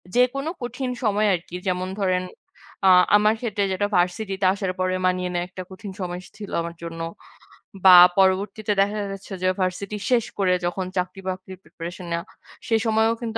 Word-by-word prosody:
যেকোনো 265 +4 +2
কঠিন 250 +2 -4
সময় 210 -1 +2
আরকি 170 0 -8
যেমন 185 0 -1
ধরেন 185 -2 +1 0.6
আ - - +6 0.3
আমার 210 +1 +5
ক্ষেত্রে 210 -4 -1
যেটা 205 +2 0
varsity 180 +3 0
তে - - +3
আসার 195 -2 -2
পরে 185 0 +1
মানিয়ে 180 0 0
নেয়া 175 0 -1
একটা 185 0 -7
কঠিন 195 +2 -8
সময় 180 -1 -4
স - - -13
ছিল 205 -2 -8
আমার 170 0 -6
জন্য। 165 0 -6 0.8
বা 185 - +10 0.2
পরবর্তীতে 195 +2 +2
দেখা 205 +2 0
যাচ্ছে 195 +1 -8
যে - - +3
varsity 185 +3 -2
শেষ 235 -3 +3
করে 185 -2 +3
যখন 185 +2 -2
চাকরি-বাকরির 185 0 -4
preparation 175 +2 -8
নেওয়া, 170 0 -2 0.4
সে 225 - +2
সময়ও 220 +1 +3
কিন্তু 225 -1 -3
190 Hz, 170 wpm, -23 LUFS, 180-215 Hz, 0.8 s, বা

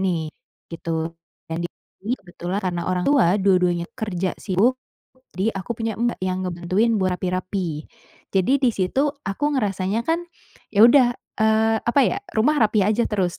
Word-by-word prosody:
nih, 180 -3 0 0.5
gitu. 165 0 -3 0.3
Dan, 165 +1 -4 0.4
ini 225 +5 -2
kebetulan, 180 +1 -5
karena 175 -1 -2
orang 180 -1 -1
tua 215 -10 +4
dua-duanya 180 -3 +2
kerja 190 -4 -2
sibuk, 210 +7 +1 0.6
jadi 200 +5 0
aku 195 +3 -6
punya 225 -2 -2
mbak 235 +2 -1
yang 185 0 -1
ngebantuin 185 +6 0
buat 185 -1 +1
rapi-rapi. 180 -3 -3 0.5
Jadi, 190 +7 +3
di 250 - +5
situ 190 +9 0 0.2
aku 195 +9 -2
ngerasanya 205 -2 0
kan, 330 +2 +1 0.5
ya 210 0 +4
udah, 245 -1 +5 0.3
eee, 220 0 +3
apa 240 +4 +2
ya, - - 0 0.2
rumah 275 +8 +3
rapi 215 0 +3
aja 220 +3 +2
terus, 185 -4 -1
195 Hz, 150 wpm, -22 LUFS, 180-225 Hz, 0.6 s, di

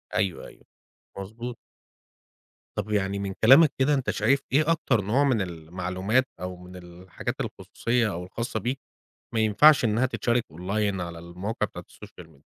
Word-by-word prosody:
أيوه، 95 -5 -1
أيوه. - - -17 0.5
مضبوط. 115 +5 -6 1.2
طب، 105 - -3
يعني 100 -1 0
من 100 -1 -3
كلامك 140 +6 +8
كده 145 +3 +3
أنت 135 -3 0
شايف 140 +1 +2
إيه 155 +4 +3
أكتر 125 -9 +1
نوع 115 +9 +2
من 130 -6 +2
المعلومات، 90 +7 -1
أو 90 +1 -5
من 90 +1 -13
الحاجات 90 0 -7
الخصوصية 115 -2 -1
أو 90 -1 -5
الخاصة 110 +4 -4
بيك، 125 +5 -3 0.6
ما 110 - +2
ينفعش 125 +7 +6
إنها 115 +4 +2
تتشارك 120 -2 0
أونلاين 95 +4 -2
على 85 -1 -5
المواقع 90 +6 -4
بتاعة - - -10
الSocial 90 - -13
Media؟ 75 -3 -23
105 Hz, 155 wpm, -26 LUFS, 90-125 Hz, 1.2 s, كلامك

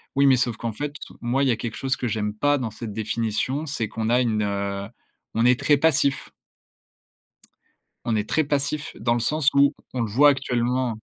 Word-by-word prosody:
Oui, 140 0 +4
mais 130 - +6
sauf 120 -2 0
qu'en 115 -2 -4
fait, 145 +5 -4 0.3
moi 125 +3 +1
il - - +2
y - - +4
a - - +2
quelque 115 -1 -5
chose 135 0 -1
que 125 - -2
j'aime 105 -1 -2
pas 145 +5 +2
dans 120 -5 -3
cette 110 0 -7
définition, 115 +6 -2
c'est 140 -7 -2
qu'on 110 +1 -3
a 125 +1 +4
une, 110 -3 0
heu 100 -1 -2 0.5
on 115 +1 +2
est 125 0 +5
très 145 -2 +3
passif 140 -2 +1 1.7
on 115 -2 0
est 105 0 -2
très 160 - +2
passif 145 +1 -2
dans 120 +2 +1
le - - 0
sens 150 +4 +2
où 140 +1 +5 0.2
on 125 - -1
le 110 - -1
voit 145 +6 +6
actuellement 125 -3 0
120 Hz, 205 wpm, -24 LUFS, 110-140 Hz, 1.7 s, mais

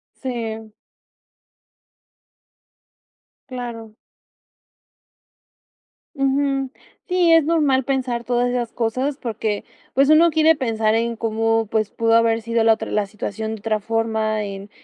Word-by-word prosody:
Sí. 225 -4 -5 2.8
Claro. 235 -4 -7 2.2
Ujú. 275 -1 0 0.4
Sí, 360 -2 +3
es 325 -2 +5
normal 295 -5 +2
pensar 255 -3 -1
todas 245 0 +1
esas 245 -2 -2
cosas 255 +5 -1
porque, 220 -4 -3 0.3
pues, 275 +2 +3
uno 320 +2 +6
quiere 320 0 +4
pensar 225 -5 0
en 230 +1 0
cómo, 225 0 0
pues, 215 -2 0
pudo 230 0 +1
haber 230 0 +3
sido 230 0 0
la 225 0 +6
otra 220 - -5
la 210 -1 +1
situación 220 +2 -5
de - - -11
otra 215 +1 -1
forma 220 0 -1
en 200 0 -7
230 Hz, 115 wpm, -21 LUFS, 220-265 Hz, 2.8 s, uno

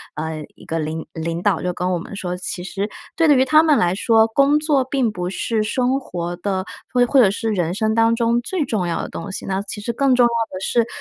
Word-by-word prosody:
呃， 155 0 -4
一 - - -16
个 165 - -2
领 155 +1 -4
领 165 +1 -4
导 200 -5 +2
就 180 - -1
跟 180 +1 -2
我 180 - 0
们 195 - -8
说， 180 -2 -4
其 180 0 -5
实 200 +2 -3 0.3
对 330 -1 +3
于 260 0 +4
他 310 +4 +6
们 310 -3 +4
来 175 0 +2
说， 220 +3 +4
工 275 +6 +3
作 300 -3 +2
并 255 -3 0
不 180 -3 -4
是 220 +3 -1
生 250 +5 0
活 175 -8 -5
的 190 0 -2 0.3
或 245 -1 +3
或 270 +3 +3
者 225 -6 +6
是 220 +3 -2
人 175 -4 -1
生 220 +2 0
当 225 0 +3
中 235 0 +1
最 325 +4 -2
重 210 -8 -1
要 170 - -2
的 - - -6
东 200 - -6
西， - - -6
那 190 0 -1
其 205 +1 -7
实 235 +3 -3
更 270 +1 +3
重 245 - +5
要 - - +3 0.2
的 185 - -5
是 230 +4 +1
210 Hz, 265 characters per minute, -20 LUFS, 180-245 Hz, 0.3 s, 他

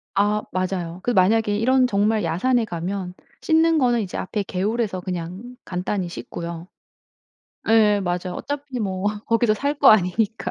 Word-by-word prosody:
아 210 +1 +2
맞아요. 185 -2 -3
그 245 - 0
만약에 210 +1 +3
이런 255 +4 +3
정말 210 0 +1
야산에 225 +9 +1
가면 180 0 -4 0.3
씻는 325 0 +3
거는 245 -4 +2
이제 190 -4 -5
앞에 205 +2 -3
개울에서 200 +1 -2
그냥 185 +7 -6
간단히 180 0 -3
씻고요. 170 0 -7 1.0
예 215 -2 +4
맞아요. 180 0 -2
어차피 285 -2 -5
뭐 190 -2 -3 0.2
거기서 230 -1 +2
살 280 +6 -1
거 280 - +6
아니니까. 215 +2 +2
205 Hz, 310 characters per minute, -22 LUFS, 180-235 Hz, 1.0 s, 거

